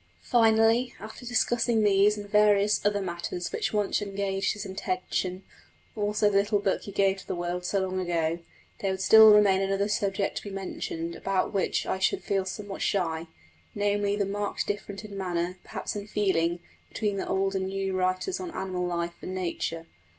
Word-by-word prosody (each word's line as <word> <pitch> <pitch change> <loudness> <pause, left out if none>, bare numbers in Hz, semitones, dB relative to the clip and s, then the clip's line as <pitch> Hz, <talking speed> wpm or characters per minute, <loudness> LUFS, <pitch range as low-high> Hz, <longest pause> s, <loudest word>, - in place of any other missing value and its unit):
Finally, 225 +1 +3
after 220 +3 -9
discussing 240 -2 +2
these 205 +1 +4
and 205 0 -7
various 210 0 +3
other 205 -1 +1
matters 175 0 -4
which - - -1
once 210 -1 0
engaged 195 -1 -1
his 210 - -6
attention, 185 -1 -3 0.5
also 210 0 +1
the 200 -1 +3
little 205 +1 +1
book 200 -1 0
he 200 - -8
gave 195 0 +2
to - - -13
the - - -2
world 175 +1 -3
so 190 +3 -1
long 185 0 -2
ago, 170 -2 0 0.4
there 195 - -1
would 190 0 -2
still 220 +2 +8
remain 200 -2 +5
another 195 +1 0
subject 200 -1 -1
to - - -2
be 205 - -7
mentioned 170 -3 -5
about 195 -1 -1
which 195 - 0
I 190 - -2
should 190 - +1
feel 195 -1 0
somewhat 200 +1 -6
shy 165 -4 0 0.5
namely, 205 0 +1
the 205 -1 0
marked 205 +1 -2
difference 205 0 -4
in 205 -2 -9
manner, 180 -1 -2
perhaps - - -5
in 205 0 -5
feeling, 175 -5 0 0.3
between 210 -3 -2
the - - -3
old 195 0 0
and 190 -1 -1
new 195 0 -2
writers 185 - 0
on 365 - -5
animal 185 -2 -2
life 170 0 -2
and 185 - -5
nature. 165 -2 -3
195 Hz, 180 wpm, -27 LUFS, 185-205 Hz, 0.5 s, still